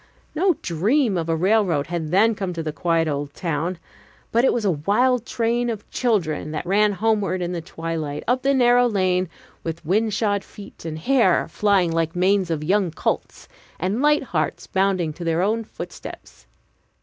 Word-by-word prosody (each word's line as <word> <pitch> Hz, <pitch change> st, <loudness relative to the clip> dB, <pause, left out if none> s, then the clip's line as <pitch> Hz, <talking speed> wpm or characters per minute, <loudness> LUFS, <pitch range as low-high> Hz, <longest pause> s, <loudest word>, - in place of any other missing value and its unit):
No 355 Hz, +2 st, +2 dB
dream 210 Hz, -, +1 dB
of 165 Hz, -1 st, -2 dB
a 165 Hz, -, +2 dB
railroad 185 Hz, -4 st, +2 dB
had 165 Hz, -2 st, -4 dB
then 210 Hz, +7 st, +4 dB
come 195 Hz, -3 st, -4 dB
to 165 Hz, -1 st, -4 dB
the 155 Hz, -1 st, -4 dB
quiet 165 Hz, -1 st, +1 dB
old 145 Hz, -1 st, -3 dB
town, 170 Hz, 0 st, -2 dB, 0.5 s
but 235 Hz, +1 st, +3 dB
it -, -, +4 dB
was 235 Hz, -3 st, -1 dB
a 195 Hz, -, +3 dB
wild 230 Hz, -, +1 dB
train 235 Hz, +1 st, 0 dB
of 215 Hz, -3 st, -5 dB
children 180 Hz, -, 0 dB
that 155 Hz, +2 st, -4 dB
ran 205 Hz, +3 st, +3 dB
homeward 205 Hz, -2 st, 0 dB
in 175 Hz, 0 st, -2 dB
the 175 Hz, -2 st, -3 dB
twilight 165 Hz, -3 st, -4 dB
up 250 Hz, +2 st, +2 dB
the 275 Hz, +1 st, +2 dB
narrow 245 Hz, -1 st, +5 dB
lane, 185 Hz, -4 st, +1 dB, 0.3 s
with 165 Hz, 0 st, -5 dB
wind 215 Hz, +6 st, +1 dB
shod 205 Hz, -2 st, 0 dB
feet, 200 Hz, -4 st, -13 dB
and 155 Hz, -1 st, -4 dB
hair 210 Hz, 0 st, +3 dB
flying 190 Hz, -1 st, +2 dB
like 165 Hz, 0 st, 0 dB
the 175 Hz, -, -4 dB
manes 190 Hz, 0 st, +2 dB
of 155 Hz, -2 st, -2 dB
young 190 Hz, +2 st, +2 dB
colts, 160 Hz, -, -3 dB, 0.3 s
and 190 Hz, +8 st, -1 dB
light 295 Hz, 0 st, +3 dB
hearts 170 Hz, -11 st, -2 dB
bounding 190 Hz, -4 st, 0 dB
to 175 Hz, -, -8 dB
their 165 Hz, +1 st, +1 dB
own 225 Hz, +3 st, 0 dB
footsteps. 220 Hz, -, -10 dB
190 Hz, 185 wpm, -22 LUFS, 165-225 Hz, 0.5 s, narrow